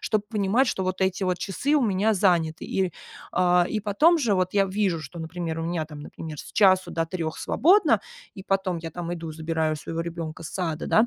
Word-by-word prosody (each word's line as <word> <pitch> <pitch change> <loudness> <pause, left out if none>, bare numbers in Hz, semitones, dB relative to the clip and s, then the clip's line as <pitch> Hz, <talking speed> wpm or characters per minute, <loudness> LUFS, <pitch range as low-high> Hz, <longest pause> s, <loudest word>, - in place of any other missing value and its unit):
чтобы 215 -1 0
понимать, 215 +4 +2
что 190 - -1
вот 185 0 -1
эти 190 0 0
часы 230 - -1
у 295 - +4
меня 215 0 +2
заняты. 170 -5 +1
И, 190 -2 0 0.4
а, 180 -1 +3
и 215 - -2
потом 220 - +4
же 245 -10 +1
вот 185 0 0
я 200 -1 +4
вижу, 190 -4 -1
что, 150 +4 -9
например, 165 0 -4
у - - -3
меня, 165 -1 -1
там, 150 -1 -10
например, 155 +1 -8
с - - -9
часу 190 -3 +4
до 165 - 0
3 165 -2 -4
свободно, 385 +7 +4 0.3
и 195 - -10
потом 190 -2 0
я 165 0 -6
там 170 +1 -5
иду, 165 -2 -5
забираю 160 0 -1
своего 165 +2 -5
ребенка 165 -1 -6
с 155 - -6
сада, 165 -4 -3
да. 220 +2 +4
180 Hz, 210 wpm, -25 LUFS, 165-200 Hz, 0.4 s, у